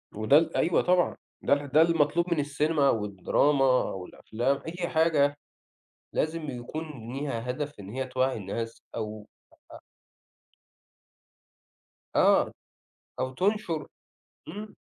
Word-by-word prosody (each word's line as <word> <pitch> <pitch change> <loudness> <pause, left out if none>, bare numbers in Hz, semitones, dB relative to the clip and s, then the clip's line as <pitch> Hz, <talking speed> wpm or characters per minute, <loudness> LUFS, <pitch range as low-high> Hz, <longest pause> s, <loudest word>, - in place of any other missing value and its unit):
وده 110 +7 +5
ال 165 - +1
أيوه 170 +1 +3
طبعًا. 180 -1 +2 0.3
ده - - +3
ال 145 0 0
ده 155 +4 +5
المطلوب 170 +1 +2
من 160 - -1
السينما 145 0 +2
والدراما 110 +7 +2 0.3
والأفلام، 120 +8 -2
أي 175 +1 -3
حاجة 155 -3 +3 0.8
لازم 155 -1 -1
يكون 125 -1 -6
ليها 125 -4 -3
هدف 145 +1 -4
إن 100 -1 -9
هي 130 +4 -3
توعِّي 130 0 0
الناس 115 +3 -5
أو 110 -1 -5 0.4
أ - - -9 2.4
آه، - - +4 0.7
أو 130 0 -2
تنشر 185 -3 0 0.6
إمم. 210 +5 -7
145 Hz, 115 wpm, -28 LUFS, 120-160 Hz, 2.4 s, وده